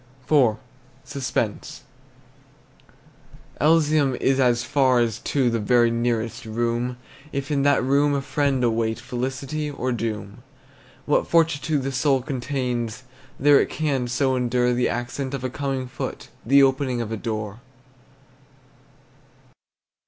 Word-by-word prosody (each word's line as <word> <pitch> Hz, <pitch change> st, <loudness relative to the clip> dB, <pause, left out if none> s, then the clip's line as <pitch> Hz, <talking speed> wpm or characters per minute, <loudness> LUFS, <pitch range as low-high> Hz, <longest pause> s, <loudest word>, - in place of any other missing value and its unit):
IV. 130 Hz, -8 st, +4 dB, 0.5 s
SUSPENSE. 130 Hz, -6 st, -3 dB, 1.8 s
Elysium 150 Hz, -3 st, +3 dB
is 135 Hz, +2 st, +1 dB
as 120 Hz, -2 st, +3 dB
far 130 Hz, -3 st, +3 dB
as 115 Hz, -2 st, 0 dB
to 130 Hz, -4 st, 0 dB
The 115 Hz, -, 0 dB
very 120 Hz, +2 st, +3 dB
nearest 115 Hz, -1 st, -1 dB
room, 120 Hz, +2 st, -2 dB, 0.3 s
If 140 Hz, +1 st, -4 dB
in 140 Hz, -2 st, +1 dB
that 145 Hz, -2 st, +3 dB
room 140 Hz, +2 st, +2 dB
a 140 Hz, -, 0 dB
friend 140 Hz, -2 st, 0 dB
await 115 Hz, -1 st, 0 dB
Felicity 130 Hz, +4 st, -4 dB
or 130 Hz, -3 st, -3 dB
doom. 110 Hz, -4 st, -4 dB, 0.6 s
What -, -, +1 dB
fortitude 155 Hz, -3 st, +1 dB
the 135 Hz, -, -2 dB
soul 135 Hz, 0 st, +1 dB
contains, 125 Hz, -3 st, -3 dB, 0.4 s
That 145 Hz, +1 st, +6 dB
it -, -, 0 dB
can 140 Hz, -5 st, -1 dB
so 130 Hz, +2 st, +1 dB
endure 125 Hz, 0 st, +1 dB
The 125 Hz, 0 st, +1 dB
accent 125 Hz, +3 st, -3 dB
of 130 Hz, -, -6 dB
a 130 Hz, -, -2 dB
coming 135 Hz, -2 st, -3 dB
foot, 125 Hz, 0 st, -6 dB
The 140 Hz, +4 st, +5 dB
opening 135 Hz, -2 st, +1 dB
of 115 Hz, -2 st, -4 dB
a 110 Hz, -, -2 dB
door! 110 Hz, -1 st, -4 dB
130 Hz, 130 wpm, -23 LUFS, 120-140 Hz, 1.8 s, That